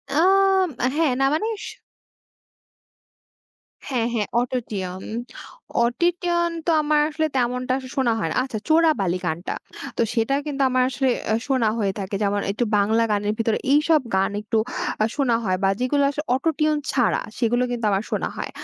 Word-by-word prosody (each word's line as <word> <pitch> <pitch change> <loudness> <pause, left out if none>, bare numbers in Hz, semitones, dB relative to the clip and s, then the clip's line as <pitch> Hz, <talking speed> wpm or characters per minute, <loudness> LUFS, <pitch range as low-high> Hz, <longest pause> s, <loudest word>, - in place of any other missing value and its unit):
আম 385 +2 +4 0.3
হ্যাঁ, 315 -3 +2
না 270 - +3
মানে 370 +8 0 0.2
স - - -6 2.2
হ্যাঁ, 250 -5 -1
হ্যাঁ 215 -3 0
Auto-Tune, 205 -7 -3 0.7
Auto-Tune 345 +6 +1
তো 340 - +2
আমার 300 0 +2
আসলে 315 +1 0
তেমনটা 250 0 0 0.2
শোনা 260 -3 +2
হয় 165 - -1
না। - - -3
আচ্ছা, 255 -4 -4
'চোরাবালি' 310 - +3
গানটা 170 +2 -2 0.4
তো - - +2
সেটা 225 +4 +1
কিন্তু 280 -2 -3
আমার 255 0 +2
আসলে 265 +1 0 0.2
আ - - +3
শোনা 260 -5 +2
হয়ে 200 -2 +1
থাকে, 200 0 -4
যেমন 205 0 +1
একটু 215 - -1
বাংলা 220 +3 +3
গানের 205 0 0
ভিতরে 225 -1 +1
এইসব 300 +1 +4
গান 190 +1 +2
একটু 220 +1 -1 0.5
আ - - +4
শোনা 265 -5 +2
হয়, 185 -3 +1
বা 195 - +4
যেগুলো 280 +3 +1
আসলে 295 +1 -4
Auto-Tune 305 +2 +1
ছাড়া 245 -4 +2 0.2
সেগুলো 240 +1 +2
কিন্তু 240 -2 -2
আমার 195 +1 +1
শোনা - - -1
হয়, - - -4
250 Hz, 160 wpm, -23 LUFS, 215-305 Hz, 2.2 s, আম